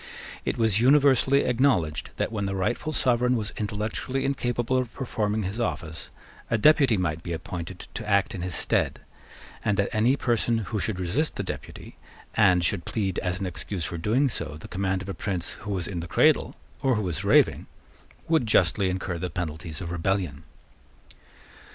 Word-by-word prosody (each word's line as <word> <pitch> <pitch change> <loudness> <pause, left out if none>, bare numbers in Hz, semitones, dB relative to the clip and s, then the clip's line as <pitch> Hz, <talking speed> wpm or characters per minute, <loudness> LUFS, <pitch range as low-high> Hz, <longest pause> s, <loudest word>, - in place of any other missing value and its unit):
It - - -1
was 110 -3 +3
universally 140 0 +5
acknowledged 120 - +1
that, - - -1
when 100 -3 -2
the 95 - -2
rightful 120 +10 -1
sovereign 125 -3 +2
was 110 -3 -3
intellectually 110 +6 -2
incapable 120 -2 0
of 125 -3 -3
performing 110 -5 -1
his 100 +5 -4
office, 80 -8 -3 0.4
a 115 - +2
deputy 135 -2 +5
might 80 -3 -1
be 85 0 -4
appointed 85 +2 -6
to 110 -2 -5
act 100 -1 +2
in 95 - -5
his 90 -1 -3
stead, - - +1 0.6
and 100 -2 +1
that 100 - +1
any 115 +5 +3
person 120 -3 +1
who 110 0 -3
should 100 -1 -2
resist 105 - 0
the - - -2
deputy, - - -8 0.4
and 90 -5 +4
should 90 -2 0
plead 95 -5 -1
as 90 0 -2
an 100 - -2
excuse 90 0 -3
for 85 - -4
doing 120 - +2
so 75 - -4
the - - -10
command 95 0 -1
of 100 - -8
a - - -2
prince 95 -4 -3
who 105 -1 -8
was 90 -3 -2
in 90 -3 -4
the 85 - -5
cradle, - - +3 0.3
or 130 -2 +3
who 105 - -1
was 90 -5 -3
raving, - - +4 0.6
would 160 -8 +2
justly 95 -1 +3
incur 90 -1 -3
the 90 +1 -3
penalties 80 0 -5
of 85 -2 -5
rebellion. 85 -4 -1
100 Hz, 180 wpm, -26 LUFS, 90-120 Hz, 0.6 s, universally